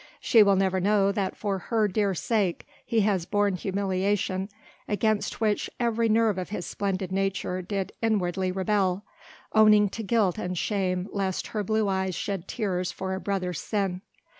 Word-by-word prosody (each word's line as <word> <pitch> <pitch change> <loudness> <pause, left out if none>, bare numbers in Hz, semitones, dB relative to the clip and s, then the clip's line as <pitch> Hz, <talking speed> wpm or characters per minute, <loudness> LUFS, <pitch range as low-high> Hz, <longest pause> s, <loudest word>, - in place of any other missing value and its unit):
She 230 - +5
will 200 -1 +5
never 190 -1 +1
know 200 +1 +3
that 195 -1 -2
for 200 -2 -2
her 220 +3 +1
dear 200 -1 0
sake, 200 -3 0 0.2
he 225 -1 +1
has 195 -4 +1
borne 205 -1 +1
humiliation 190 0 -1 0.4
against 215 0 0
which 215 -2 0
every 230 -1 +1
nerve 220 -3 +3
of 180 - -5
his 190 -4 -4
splendid 190 -2 -2
nature 195 -1 -1
did 195 +1 -3
inwardly 190 -4 0
rebel, 190 0 0 0.5
owning 215 -1 +6
to 225 - -6
guilt 215 -3 +1
and 180 -3 -3
shame 185 -1 -1
lest 195 -2 -2
her 210 -2 -2
blue 215 +1 +1
eyes 190 -2 -1
shed 195 -3 -3
tears 185 -5 -2
for 190 +1 -4
a 190 - -3
brother's 185 -4 -2
sin. 195 -4 -2
195 Hz, 165 wpm, -27 LUFS, 185-210 Hz, 0.5 s, owning